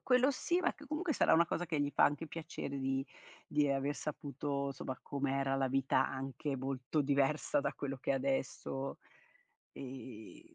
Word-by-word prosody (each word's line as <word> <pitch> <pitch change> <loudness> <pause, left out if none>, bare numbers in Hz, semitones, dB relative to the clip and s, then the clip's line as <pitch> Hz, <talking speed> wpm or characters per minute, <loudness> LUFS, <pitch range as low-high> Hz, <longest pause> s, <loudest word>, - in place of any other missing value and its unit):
Quello 255 +2 +4
sì 345 +6 +1
ma 350 - +2
che 295 - -13
comunque 310 +2 0
sarà - - +5
una 170 +1 +6
cosa 175 +2 -1
che 155 -3 0
gli 145 0 +1
fa - - +5
anche 145 +3 +1
piacere 155 -4 -5
di 135 0 0 0.4
di 145 -1 +2
aver 140 +1 +1
saputo, 140 -1 -3
somma, 130 -1 -5
com'era 135 -1 0
la 135 -1 +2
vita 135 0 +3
anche 135 +1 -3
molto 135 +3 -1
diversa 140 +1 +2
da - - 0
quello 135 -2 -3
che 135 - 0
è - - +2
adesso; 135 0 -1 0.7
e 125 -4 -9
140 Hz, 170 wpm, -35 LUFS, 135-150 Hz, 0.7 s, una